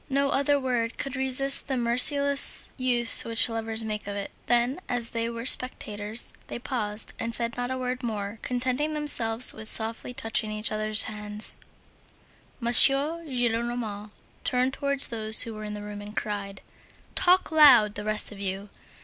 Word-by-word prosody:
No 275 0 -1
other 285 +1 0
word 245 -3 -4
could 275 0 -4
resist 265 +1 +4
the 265 -2 -3
merciless 275 +4 +2
use 245 -3 +5
which 230 +1 0
lovers 225 0 -5
make 210 -1 -7
of 200 - -7
it. 200 -1 -7 0.2
Then 245 +5 -1
as 240 -2 -4
there 230 0 -4
were 230 0 -9
spectators, 215 -4 +1
they - - -8
paused 225 -4 -6
and 230 0 -5
said 235 -1 -5
not 245 0 -5
a 260 - -5
word 255 0 -6
more, 215 -3 -7
contenting 255 +5 -3
themselves 250 -6 +4
with 220 0 -2
softly 225 +2 -2
touching 225 -3 -2
each 215 +1 -3
other's 215 0 +5
hands. 210 0 -5 1.0
M. 235 -1 -4
Gillenormand 245 -7 +2 0.3
turned 255 0 -2
towards 280 0 -2
those 220 -1 +3
who 230 - -9
were 215 0 -10
in 210 0 -8
the 205 - -10
room 205 0 -10
and 210 +1 -13
cried: 200 -2 -6 0.5
"Talk 365 -1 +1
loud, 255 -10 +4
the 205 - -6
rest 215 +1 +2
of 205 - -13
you. 195 +1 -6
235 Hz, 165 wpm, -24 LUFS, 215-260 Hz, 1.0 s, use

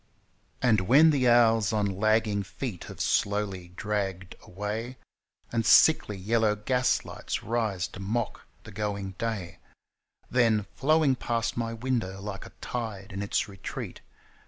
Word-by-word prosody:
And 110 -5 +4
when 155 +5 +7
the 130 -4 +3
hours 115 -4 +4
on 105 -2 +1
lagging 105 +1 +1
feet 100 0 -6
have - - -10
slowly 100 -3 0
dragged 95 -3 -3
away, 105 +6 -5 0.5
And 115 -1 0
sickly 105 -6 +5
yellow 110 +2 +1
gaslights 125 +4 -1
rise 110 -6 -1
to - - -11
mock 110 +4 -3 0.2
the - - -11
going 100 -2 -3
day, 110 -7 -3 0.7
Then, 115 -5 +2
flowing 155 -1 +3
past 115 -2 -2
my 115 -1 -2
window, 115 -6 -2
like 100 -1 -6
a - - -17
tide 110 -4 -5
in 100 - -4
its 100 +2 0
retreat. 95 -2 -7
110 Hz, 135 wpm, -28 LUFS, 100-120 Hz, 0.7 s, when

